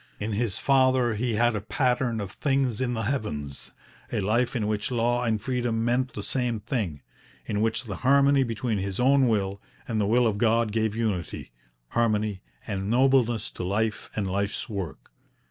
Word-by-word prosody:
In 105 +2 -3
his 110 -2 0
father 130 -3 +3
he 115 +1 -1
had 120 +1 +3
a 105 - -2
pattern 125 +1 0
of 100 -2 -5
things 135 -4 0
in 125 -1 0
the 110 - -2
heavens; 75 - -3 0.4
a - - 0
life 120 +6 +1
in 115 -4 0
which 105 -1 -1
law 120 0 +1
and 110 -3 +1
freedom 120 -1 -1
meant 125 +2 +1
the 105 - -5
same 125 -3 -1
thing; 105 - -3 0.4
in 105 +8 -1
which 110 +1 0
the 105 -6 -6
harmony 140 +1 +4
between 115 -3 -1
his 95 0 -3
own 135 +1 +4
will 100 -3 0 0.3
and 110 -3 0
the 100 - +1
will 120 +3 +4
of 105 -3 0
God 115 -1 +2
gave 110 -1 0
unity, 105 - -3 0.4
harmony, 110 -4 0 0.2
and 100 -2 -3
nobleness 125 -2 +3
to - - -6
life 105 +4 -1
and 105 -2 -1
life's 100 +4 -2
work. 95 - -6
115 Hz, 180 wpm, -26 LUFS, 105-125 Hz, 0.4 s, harmony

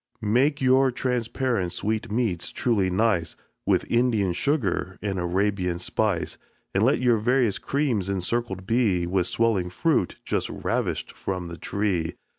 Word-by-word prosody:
Make 140 +5 +3
your 130 +1 +5
transparent 120 -5 -1
sweetmeats 110 -3 -1
truly 105 -6 +1
nice 90 -4 +1 0.3
With - - +2
Indian 115 -6 +2
sugar 100 - -1
and 100 -2 -2
Arabian 90 0 0
spice. 95 0 -1 0.3
And - - +2
let - - +3
your 120 -3 +3
various 120 -1 +2
creams 125 -10 0
encircled 95 +1 -2
be 105 -6 +2
With 90 0 0
swelling 105 -6 +1
fruit 95 - +1
just - - -1
ravish'd - - -2
from 90 -3 -4
the 85 - -7
tree. 95 -6 -1
105 Hz, 130 wpm, -25 LUFS, 90-120 Hz, 0.3 s, your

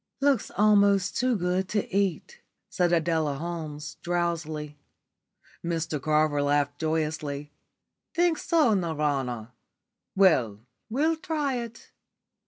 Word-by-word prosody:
"Looks 275 -5 +2
almost 200 -2 +4
too 255 -1 +2
good 180 0 -1
to 210 -2 -1
eat," 200 - -1 0.3
said 175 -1 +1
Adela 160 -3 +1
Holmes, 150 -2 -6
drowsily. 160 -4 -2 0.8
Mr 165 -3 -2
Carver 150 0 +2
laughed 145 0 +1
joyously. 155 -2 -2 0.6
"Think 345 -2 +2
so, 310 -9 +3
Nirvana? 145 - -1 0.6
Well, 130 - +3 0.3
we'll 310 +8 +1
try 305 -6 -1
it." 235 -1 -8
170 Hz, 100 wpm, -27 LUFS, 150-210 Hz, 0.8 s, almost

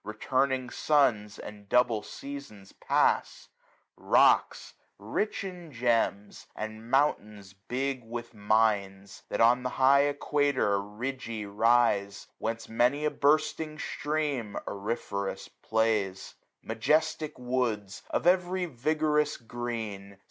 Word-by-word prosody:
Returning 130 +4 -1
suns 115 -9 +2
and 105 -1 -10
double 120 -3 +3
seasons 140 -10 -9
pass: - - 0 0.4
645 - - -16
Rocks - - +4 0.2
rich 110 - -2
in 180 -4 -8
gems, 115 -5 -1
and 110 +1 -7
mountains 105 -8 0
big 125 +6 -3
with 120 +1 -7
mines. 105 -2 0
That - - -1
on 120 +2 +5
the 125 - -2
high 140 +2 +5
equator 145 -7 +1
ridgy 115 +1 -5
rise. 100 -2 +2
Whence 115 0 -3
many 125 +6 +1
a 150 - +1
bursting 155 +1 +1
stream 145 -9 -2
auriferous 100 -1 -4
plays: 110 -4 -1 0.3
Majestic 155 0 0
woods, 120 -6 -2
of - - -1
every 180 0 +2
vigorous 150 +1 0
green. 110 -5 -6
120 Hz, 105 wpm, -29 LUFS, 105-140 Hz, 0.4 s, on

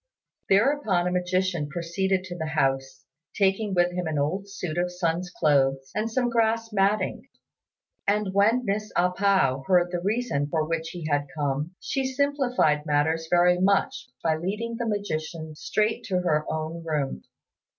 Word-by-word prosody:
Thereupon 205 -4 +3
a 180 - 0
magician 180 -3 0
proceeded 185 +3 -1
to 180 -2 -7
the 160 -2 -4
house, 135 -3 -1 0.3
taking 195 0 +1
with 175 0 +3
him 180 -1 -3
an 155 -1 -2
old 185 +8 -1
suit 175 -4 -4
of 180 0 0
Sun's 180 0 -1
clothes 135 -5 +1
and 215 +2 -1
some 245 +2 0
grass 230 -1 +1
matting; 200 +1 0 0.8
and 205 -1 +1
when 220 +5 +3
Miss 215 +1 -2
A 180 +1 +3
pao 180 -9 +2
heard 175 -1 +3
the 175 -1 -2
reason 205 -7 0
for 155 0 0
which 165 0 -2
he 175 -3 -7
had 145 -1 0
come, 145 +4 -2
she 270 - -2
simplified 260 - +1
matters 160 +2 +1
very 180 0 +4
much 195 +1 +1
by 160 -1 +2
leading 210 +8 -3
the 235 -1 -2
magician 160 -6 -3
straight 215 +8 -1
to 185 -2 0
her 155 -4 0
own 160 +1 -4
room. 150 - -2
180 Hz, 160 wpm, -26 LUFS, 155-205 Hz, 0.8 s, very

